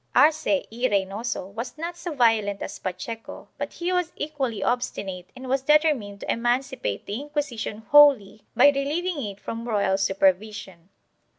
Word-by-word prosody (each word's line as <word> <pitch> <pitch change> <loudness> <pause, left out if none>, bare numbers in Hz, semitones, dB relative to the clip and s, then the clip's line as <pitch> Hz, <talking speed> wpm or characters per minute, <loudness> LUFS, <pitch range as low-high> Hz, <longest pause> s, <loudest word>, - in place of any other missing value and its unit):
Arce 300 +1 +4
y 240 +3 0
Reynoso 200 +2 -1
was 235 +6 -6
not 335 +2 -4
so 345 -2 -6
violent 220 -5 +2
as 200 - -7
Pacheco 225 +5 -6
but - - -4
he 355 +1 -2
was 360 -2 0
equally 275 -7 -3
obstinate 195 -7 -2
and 260 0 -9
was 265 +1 +1
determined 275 -9 +2
to - - -2
emancipate 240 - -1
the 210 +6 -4
Inquisition 280 -7 -4
wholly 275 -8 +6
by 285 - +7
relieving 295 +4 -1
it 200 -2 -6
from 230 +2 -6
royal 200 -3 +1
supervision. 195 -2 0
240 Hz, 150 wpm, -25 LUFS, 205-290 Hz, -, by